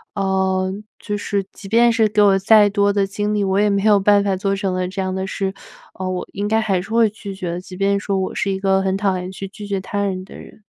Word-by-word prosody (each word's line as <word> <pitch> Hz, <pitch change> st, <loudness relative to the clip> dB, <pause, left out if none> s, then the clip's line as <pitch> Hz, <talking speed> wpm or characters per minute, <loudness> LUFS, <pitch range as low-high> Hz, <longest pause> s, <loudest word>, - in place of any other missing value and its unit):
呃， 190 Hz, -1 st, 0 dB, 0.3 s
就 210 Hz, -1 st, -3 dB
是 200 Hz, -1 st, -2 dB
即 200 Hz, -, -11 dB
便 235 Hz, +2 st, +5 dB
是 225 Hz, -2 st, +3 dB
给 210 Hz, 0 st, +2 dB
我 200 Hz, -2 st, +5 dB
再 210 Hz, +1 st, +5 dB
多 200 Hz, 0 st, +2 dB
的 200 Hz, -1 st, +1 dB
精 205 Hz, +2 st, -2 dB
力， 205 Hz, -1 st, +1 dB
我 190 Hz, 0 st, 0 dB
也 210 Hz, 0 st, +3 dB
没 200 Hz, -1 st, 0 dB
有 210 Hz, -1 st, +5 dB
办 205 Hz, +1 st, +4 dB
法 200 Hz, -1 st, 0 dB
做 195 Hz, +1 st, -1 dB
成 195 Hz, -2 st, -2 dB
的 185 Hz, 0 st, -1 dB
这 190 Hz, +1 st, -4 dB
样 185 Hz, 0 st, -2 dB
的 190 Hz, 0 st, -3 dB
事， 195 Hz, 0 st, -3 dB, 0.4 s
呃， 185 Hz, 0 st, -4 dB
我 185 Hz, -1 st, -3 dB
应 200 Hz, +1 st, -3 dB
该 220 Hz, +1 st, +2 dB
还 195 Hz, -4 st, 0 dB
是 190 Hz, -, -11 dB
会 225 Hz, 0 st, +3 dB
拒 200 Hz, -2 st, -8 dB
绝 180 Hz, -2 st, -4 dB
的， 175 Hz, -, -4 dB
即 185 Hz, 0 st, -11 dB
便 200 Hz, +1 st, +1 dB
说 200 Hz, -1 st, -2 dB
我 190 Hz, 0 st, -2 dB
是 -, -, -1 dB
一 190 Hz, -, -1 dB
个 195 Hz, 0 st, +2 dB
很 190 Hz, 0 st, 0 dB
讨 195 Hz, -2 st, 0 dB
厌 180 Hz, 0 st, -5 dB
去 190 Hz, +1 st, -7 dB
拒 205 Hz, +1 st, -9 dB
绝 200 Hz, -1 st, -1 dB
他 200 Hz, +1 st, -3 dB
人 185 Hz, -2 st, -3 dB
的 -, -, -13 dB
人。 215 Hz, -, -13 dB
195 Hz, 295 characters per minute, -20 LUFS, 190-205 Hz, 0.4 s, 便